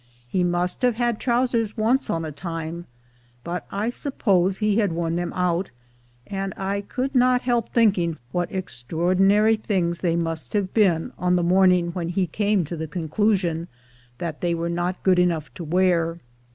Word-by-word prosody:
He 180 Hz, +9 st, 0 dB
must 175 Hz, 0 st, 0 dB
have 250 Hz, -2 st, +2 dB
had 240 Hz, -1 st, 0 dB
trousers 235 Hz, -3 st, 0 dB
once 235 Hz, +5 st, +1 dB
on 165 Hz, -1 st, -1 dB
a 155 Hz, -, -5 dB
time, 165 Hz, +2 st, -6 dB, 0.6 s
but 175 Hz, +1 st, -5 dB
I 215 Hz, +4 st, -1 dB
suppose 195 Hz, -, +1 dB
he 210 Hz, 0 st, +1 dB
had 205 Hz, -5 st, +2 dB
worn 165 Hz, 0 st, -1 dB
them 175 Hz, 0 st, -2 dB
out; 180 Hz, +1 st, 0 dB, 0.6 s
and 195 Hz, -1 st, -4 dB
I 195 Hz, +1 st, -2 dB
could 255 Hz, +6 st, -3 dB
not 250 Hz, -1 st, +3 dB
help 240 Hz, -3 st, 0 dB
thinking 190 Hz, -8 st, +2 dB
what 175 Hz, +2 st, -1 dB
extraor 170 Hz, -1 st, -2 dB
dinary 210 Hz, +3 st, +4 dB
things 175 Hz, -5 st, 0 dB
they 170 Hz, -2 st, +1 dB
must 165 Hz, -2 st, -2 dB
have 200 Hz, -3 st, -1 dB
been 180 Hz, -7 st, +2 dB
on 180 Hz, 0 st, +2 dB
the 175 Hz, -, +1 dB
morning 180 Hz, -1 st, +4 dB
when 170 Hz, -1 st, -3 dB
he 185 Hz, +1 st, +1 dB
came 205 Hz, +1 st, 0 dB
to 170 Hz, -, -5 dB
the 160 Hz, 0 st, -4 dB
conclusion 170 Hz, +1 st, 0 dB, 0.5 s
that 165 Hz, -1 st, -5 dB
they 175 Hz, -1 st, +1 dB
were 170 Hz, +1 st, -2 dB
not 175 Hz, +2 st, -2 dB
good 185 Hz, -2 st, +4 dB
enough 170 Hz, -4 st, 0 dB
to 175 Hz, -, -7 dB
wear. 170 Hz, 0 st, +1 dB
180 Hz, 175 wpm, -23 LUFS, 170-210 Hz, 0.6 s, dinary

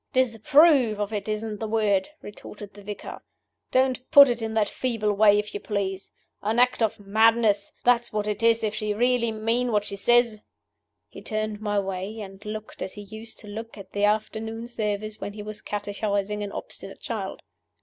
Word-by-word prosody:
"'Disapprove 260 Hz, -1 st, +4 dB
of 205 Hz, +1 st, -2 dB
it' 205 Hz, 0 st, -3 dB
isn't 215 Hz, 0 st, -3 dB
the 220 Hz, -, -3 dB
word," 210 Hz, -2 st, +1 dB
retorted 205 Hz, 0 st, -10 dB
the 205 Hz, -, -13 dB
vicar. 205 Hz, +1 st, -7 dB, 0.5 s
"Don't 260 Hz, 0 st, +1 dB
put 280 Hz, -2 st, +9 dB
it 240 Hz, -1 st, -1 dB
in 220 Hz, 0 st, -3 dB
that 215 Hz, -2 st, +3 dB
feeble 225 Hz, -4 st, -1 dB
way, 205 Hz, 0 st, +5 dB
if 210 Hz, 0 st, -2 dB
you 205 Hz, -, -3 dB
please. 195 Hz, -2 st, -3 dB, 0.3 s
An 215 Hz, +3 st, -1 dB
act 250 Hz, 0 st, +3 dB
of 220 Hz, -2 st, +1 dB
madness 215 Hz, 0 st, +3 dB
that's 240 Hz, -1 st, +3 dB
what 210 Hz, -1 st, -1 dB
it 210 Hz, 0 st, -2 dB
is, 230 Hz, 0 st, +3 dB
if 210 Hz, -1 st, 0 dB
she 210 Hz, -1 st, -2 dB
really 240 Hz, 0 st, +2 dB
mean 230 Hz, +3 st, 0 dB
what 210 Hz, -1 st, +1 dB
she 200 Hz, -, -4 dB
says." 235 Hz, +1 st, +3 dB, 0.7 s
He -, -, -12 dB
turned 215 Hz, -1 st, -3 dB
my 205 Hz, -1 st, -1 dB
way, 195 Hz, +2 st, -4 dB
and 195 Hz, -1 st, -9 dB
looked 215 Hz, 0 st, -7 dB
as -, -, -4 dB
he 205 Hz, -, -7 dB
used 220 Hz, +2 st, -10 dB
to 210 Hz, -, -13 dB
look 225 Hz, +2 st, -7 dB
at 195 Hz, -2 st, -11 dB
the 205 Hz, -, -2 dB
afternoon 220 Hz, +2 st, -1 dB
service 215 Hz, -2 st, -3 dB
when 200 Hz, -, -4 dB
he 210 Hz, 0 st, -7 dB
was 215 Hz, 0 st, -7 dB
catechising 205 Hz, 0 st, -2 dB
an 200 Hz, -, -5 dB
obstinate 195 Hz, 0 st, -8 dB
child. 200 Hz, -5 st, -5 dB
215 Hz, 190 wpm, -25 LUFS, 205-225 Hz, 0.7 s, put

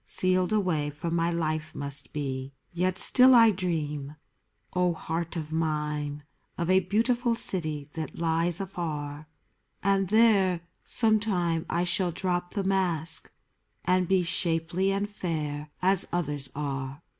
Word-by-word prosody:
Sealed 185 Hz, 0 st, 0 dB
away 180 Hz, -9 st, +1 dB
from 155 Hz, +4 st, -4 dB
my 170 Hz, 0 st, +1 dB
life 155 Hz, -2 st, -2 dB
must 140 Hz, 0 st, -4 dB
be. 135 Hz, -2 st, -4 dB, 0.2 s
Yet 180 Hz, +2 st, 0 dB
still 255 Hz, +5 st, +6 dB
I 230 Hz, -2 st, +7 dB
dream, 150 Hz, -6 st, -3 dB, 0.6 s
O 180 Hz, -1 st, +1 dB
heart 165 Hz, +1 st, -4 dB
of 155 Hz, -2 st, -5 dB
mine! 150 Hz, -2 st, -2 dB, 0.3 s
Of 170 Hz, +1 st, 0 dB
a 190 Hz, -, +6 dB
beautiful 230 Hz, +6 st, +1 dB
city 155 Hz, -10 st, -1 dB
that 160 Hz, -1 st, -6 dB
lies 165 Hz, +1 st, 0 dB
afar; 155 Hz, -6 st, -5 dB, 0.6 s
And 195 Hz, -1 st, +2 dB
there, 200 Hz, -5 st, +4 dB, 0.2 s
some 220 Hz, -2 st, +3 dB
time, 175 Hz, -6 st, -1 dB
I 170 Hz, +1 st, 0 dB
shall 180 Hz, 0 st, +1 dB
drop 175 Hz, +1 st, -2 dB
the 200 Hz, -, 0 dB
mask, 180 Hz, -4 st, +1 dB, 0.5 s
And 180 Hz, 0 st, +2 dB
be 190 Hz, 0 st, +3 dB
shapely 170 Hz, +2 st, 0 dB
and 200 Hz, +1 st, -1 dB
fair 155 Hz, -7 st, -4 dB
as 190 Hz, 0 st, +4 dB
others 145 Hz, -6 st, -2 dB
are. 135 Hz, 0 st, -4 dB
170 Hz, 135 wpm, -27 LUFS, 150-190 Hz, 0.6 s, I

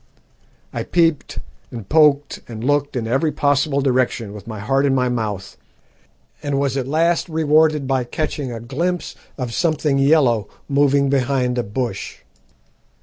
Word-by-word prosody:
I -, -, -3 dB
peeped 165 Hz, -4 st, 0 dB, 0.3 s
and 115 Hz, -5 st, -8 dB
poked 145 Hz, -2 st, +3 dB
and 115 Hz, -1 st, -7 dB
looked 145 Hz, +1 st, 0 dB
in 120 Hz, -3 st, -2 dB
every 135 Hz, +7 st, +1 dB
possible 145 Hz, 0 st, +1 dB
direction, 125 Hz, -5 st, 0 dB
with 105 Hz, 0 st, -11 dB
my 110 Hz, -2 st, -6 dB
heart 135 Hz, +7 st, +1 dB
in 135 Hz, -, +2 dB
my 125 Hz, -1 st, +1 dB
mouth, 105 Hz, -5 st, -4 dB, 0.8 s
and 140 Hz, -1 st, -1 dB
was 140 Hz, -1 st, 0 dB
at 130 Hz, -2 st, -2 dB
last 165 Hz, +4 st, +1 dB
rewarded 155 Hz, -2 st, +2 dB
by 130 Hz, -2 st, 0 dB
catching 145 Hz, 0 st, -3 dB
a 115 Hz, -, -5 dB
glimpse 165 Hz, +10 st, -3 dB, 0.2 s
of 125 Hz, -4 st, -4 dB
something 155 Hz, -4 st, +1 dB
yellow 135 Hz, -7 st, +3 dB, 0.2 s
moving 140 Hz, 0 st, +2 dB
behind 125 Hz, -2 st, +1 dB
a -, -, 0 dB
bush. 110 Hz, 0 st, -4 dB
135 Hz, 145 wpm, -20 LUFS, 120-150 Hz, 0.8 s, poked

